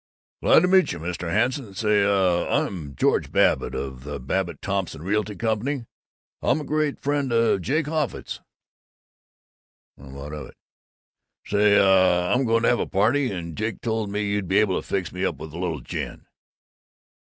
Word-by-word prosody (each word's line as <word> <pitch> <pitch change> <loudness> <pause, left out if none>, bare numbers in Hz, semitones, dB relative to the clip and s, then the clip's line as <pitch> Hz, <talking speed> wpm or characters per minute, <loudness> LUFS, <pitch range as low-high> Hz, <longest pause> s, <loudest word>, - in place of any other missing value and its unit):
"Glad 180 - +5
meet 185 - +4
you, - - -6
Mr. 85 +1 -4
Hanson. 115 - 0
Say, 105 -1 +2
uh 95 -3 +2
I'm 75 -8 -2
George - - +1
Babbitt - - +2
of 65 -2 -5
the 70 0 -6
Babbitt 85 +7 -2
Thompson 95 -5 -3
Realty 105 +2 -1
Company. 115 +4 -1 0.6
I'm 145 - +2
a - - -5
great 150 0 -1
friend 140 -2 -1
of 115 -4 +2
Jake 150 - 0
Offutt's." 155 -3 -3 1.6
"Well, 70 0 -13
what 70 +2 -8
of 75 -3 -6
it?" - - -17 0.9
"Say, 105 0 +4
uh, 95 -2 +4
I'm 130 +2 +2
going 115 0 +2
to - - +4
have 120 - +2
a - - -1
party, 115 +7 +2
and 85 -4 -5
Jake 110 +1 -3
told 110 -3 -1
me 105 +1 -2
you'd 100 -2 -1
be 95 +3 +2
able 105 -3 +2
to - - -17
fix 95 -4 -2
me 90 +1 -4
up - - 0
with 80 -1 -9
a 85 - -6
little 85 -4 -2
gin." - - -6
100 Hz, 175 wpm, -24 LUFS, 90-115 Hz, 1.6 s, Glad